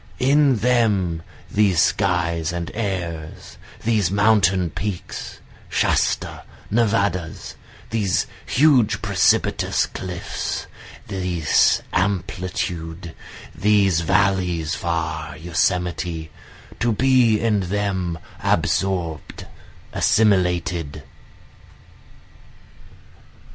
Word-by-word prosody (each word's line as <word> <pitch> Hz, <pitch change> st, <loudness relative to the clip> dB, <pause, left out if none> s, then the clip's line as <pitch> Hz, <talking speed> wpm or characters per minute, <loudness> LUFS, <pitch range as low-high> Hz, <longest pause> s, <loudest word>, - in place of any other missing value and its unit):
In 140 Hz, +1 st, +4 dB
them 105 Hz, -8 st, +1 dB, 0.3 s
these 100 Hz, -5 st, +3 dB
skies 85 Hz, -4 st, +1 dB
and 85 Hz, -1 st, -4 dB
airs, 85 Hz, -7 st, -5 dB, 0.2 s
these 110 Hz, -6 st, +2 dB
mountain 100 Hz, -4 st, +3 dB
peaks, 95 Hz, 0 st, -5 dB, 0.3 s
Shasta, -, -, 0 dB, 0.3 s
Nevadas, 100 Hz, -7 st, 0 dB, 0.4 s
These 105 Hz, -5 st, +1 dB, 0.2 s
huge 125 Hz, -7 st, +3 dB
precipitous 100 Hz, -5 st, +2 dB
cliffs, 90 Hz, -2 st, -5 dB, 0.4 s
this 90 Hz, -5 st, +2 dB
amplitude, 90 Hz, -3 st, -2 dB, 0.4 s
these 100 Hz, -4 st, +3 dB
valleys, 90 Hz, -3 st, +1 dB
far 80 Hz, -3 st, -3 dB
Yosemite, 85 Hz, -1 st, -1 dB, 0.5 s
To 120 Hz, -, +1 dB
be 125 Hz, -2 st, +3 dB
in 110 Hz, -3 st, +1 dB
them 95 Hz, -4 st, -1 dB, 0.2 s
absorb'd, 90 Hz, -5 st, -1 dB, 0.5 s
assimilated. 90 Hz, -7 st, +1 dB
95 Hz, 70 wpm, -22 LUFS, 85-105 Hz, 0.5 s, In